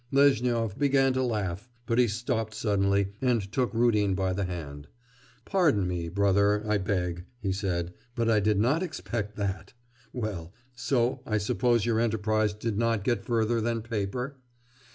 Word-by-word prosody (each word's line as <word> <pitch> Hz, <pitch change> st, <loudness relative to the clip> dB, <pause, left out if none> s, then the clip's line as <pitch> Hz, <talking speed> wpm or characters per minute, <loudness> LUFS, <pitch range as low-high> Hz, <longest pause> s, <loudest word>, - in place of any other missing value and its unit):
Lezhnyov 125 Hz, -6 st, +2 dB
began 135 Hz, -2 st, +3 dB
to 130 Hz, -, 0 dB
laugh, 105 Hz, -3 st, -2 dB, 0.2 s
but 115 Hz, +2 st, +1 dB
he 125 Hz, -, +5 dB
stopped 110 Hz, 0 st, -2 dB
suddenly 100 Hz, -2 st, +1 dB
and 115 Hz, -7 st, +1 dB
took 125 Hz, 0 st, 0 dB
Rudin 105 Hz, -4 st, +2 dB
by 95 Hz, -1 st, 0 dB
the 100 Hz, +1 st, -1 dB
hand. 75 Hz, -5 st, -6 dB, 0.6 s
'Pardon 155 Hz, -, +2 dB
me, 85 Hz, -2 st, -3 dB
brother, 100 Hz, +2 st, +2 dB
I 105 Hz, -1 st, +2 dB
beg,' 90 Hz, -3 st, -2 dB
he 100 Hz, -5 st, -1 dB
said, 90 Hz, -3 st, -2 dB, 0.2 s
'but 115 Hz, -1 st, 0 dB
I 110 Hz, -2 st, +4 dB
did 105 Hz, 0 st, +2 dB
not 130 Hz, -, +2 dB
expect 105 Hz, -, -4 dB
that. 100 Hz, -2 st, -3 dB, 0.4 s
Well, 100 Hz, -8 st, -4 dB, 0.2 s
so 125 Hz, 0 st, 0 dB
I 110 Hz, -, +1 dB
suppose 115 Hz, +2 st, +1 dB
your 115 Hz, -2 st, +1 dB
enterprise 110 Hz, -2 st, +1 dB
did 110 Hz, -1 st, -2 dB
not 115 Hz, -3 st, +1 dB
get 120 Hz, +2 st, 0 dB
further 115 Hz, 0 st, +1 dB
than 115 Hz, 0 st, -1 dB
paper? 115 Hz, +5 st, -3 dB
110 Hz, 155 wpm, -28 LUFS, 100-120 Hz, 0.6 s, he